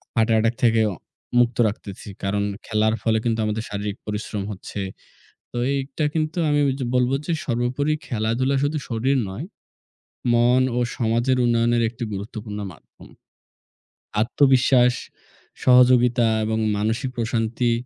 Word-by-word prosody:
Heart 115 0 +2
attack 110 +1 +2
থেকেও 110 -2 +4 0.5
মুক্ত 120 -1 +2
রাখতেছি। 100 -1 -7 0.2
কারণ, 100 +1 0 0.2
খেলার 110 0 +1
ফলে 110 -1 +2
কিন্তু 115 -1 0
আমাদের 110 +1 -2
শারীরিক 100 0 -4
পরিশ্রম 105 -1 -4
হচ্ছে। 100 +1 -6 0.7
তো - - -4 0.2
এইটা 140 +2 -2
কিন্তু 155 +1 -1
আমি 145 0 +2
ওইয 135 - +1 0.2
বলব 125 0 +2
যে 170 - -1
সর্বোপরি 130 +4 0
খেলাধুলা 120 +4 0
শুধু 150 +2 0
শরীর 130 +4 +1
নয়, 110 - -6 0.9
মন 120 +2 +4 0.2
ও - - +2 0.2
সমাজের 120 +3 +1
উন্নয়নের 120 0 +2
একটি 120 +1 -7
গুরুত্বপূর্ণ 105 +1 -6
মাধ্যম। - - -17 1.1
আত্মবিশ্বাস, 125 0 +4 0.7
সহযোগিতা 125 -1 +5 0.2
এবং 110 0 -1 0.2
মানসিক 110 +5 -1
প্রশান্তি 115 +1 0
120 Hz, 125 wpm, -23 LUFS, 110-125 Hz, 1.1 s, সহযোগিতা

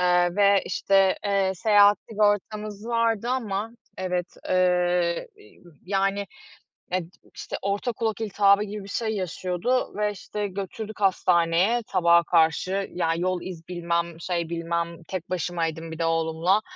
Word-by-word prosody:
eee, 180 0 +3
ve, 200 -1 +5
işte, 195 -1 +2
eee, 195 -1 +1
seyahat 205 +1 +5
sigortamız 210 0 -1
vardı 230 -1 +1
ama 220 -4 -2 0.3
Evet, 180 -1 -3
eee, 180 - +2 0.6
yani, 195 +1 0 0.7
eee, 185 -1 0 0.3
işte, - - -5
orta 200 +5 -1
kulak 220 -1 -2
iltihabı 200 -1 +3
gibi 210 -1 -6
bir 200 - -11
şey 225 +2 -2
yaşıyordu 185 +6 -1
ve, 210 0 +1
işte, 205 +1 -5
götürdük 205 +3 -6
hastaneye, 180 +3 +3
sabaha 170 -2 +4
karşı. 175 +4 +2
Ya, 165 -2 0
yol 180 +1 -1
iz 170 -3 -8
bilmem, 170 -1 -2
şey 170 -2 -2
bilmem, 170 0 -3
tek 185 -2 -5
başımaydım 165 -2 -2
bir 160 - -8
de 165 - +1
oğlumla. 165 +4 +1
185 Hz, 135 wpm, -25 LUFS, 170-205 Hz, 0.7 s, ve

